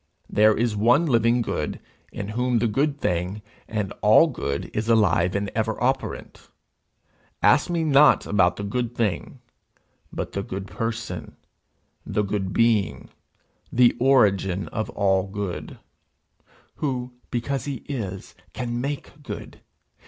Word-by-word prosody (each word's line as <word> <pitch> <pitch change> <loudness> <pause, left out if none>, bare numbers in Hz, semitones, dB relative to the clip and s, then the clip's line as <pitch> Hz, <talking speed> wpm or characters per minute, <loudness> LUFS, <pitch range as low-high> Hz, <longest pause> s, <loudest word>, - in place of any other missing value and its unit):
There 105 0 +4
is 115 -1 0
one 120 +10 +4
living 120 -3 +3
good, 75 -8 -3 0.3
in 100 -1 -5
whom 125 +2 0
the 115 - +1
good 140 +6 0
thing, 90 +2 -2 0.2
and 105 -3 -3
all 105 +9 +7
good, 95 - -4
is 110 +2 -1
alive 100 -5 +3
and 100 0 -1
ever 110 0 -1
operant. 130 +2 -2 0.9
Ask - - +4
me 170 -2 0
not 150 -1 +5
about 90 -4 +2
the 100 - -6
good 120 +3 -2
thing, 110 -5 -2 0.7
but - - -4
the 100 - -3
good 95 0 -5
person, 115 +3 -5 0.7
the 105 - -1
good 100 -1 -2
being 105 - +1 0.6
the 120 0 +4
origin 100 -7 +3
of 110 -3 -3
all 95 -1 +1
good' 100 -2 -5 1.0
who, 125 -4 -3 0.2
because 130 +3 -2
he 140 -4 -5
is, 100 -9 -5 0.2
can 120 -1 -3
make 145 +1 -5
good. 145 - -8
110 Hz, 130 wpm, -24 LUFS, 100-125 Hz, 1.0 s, all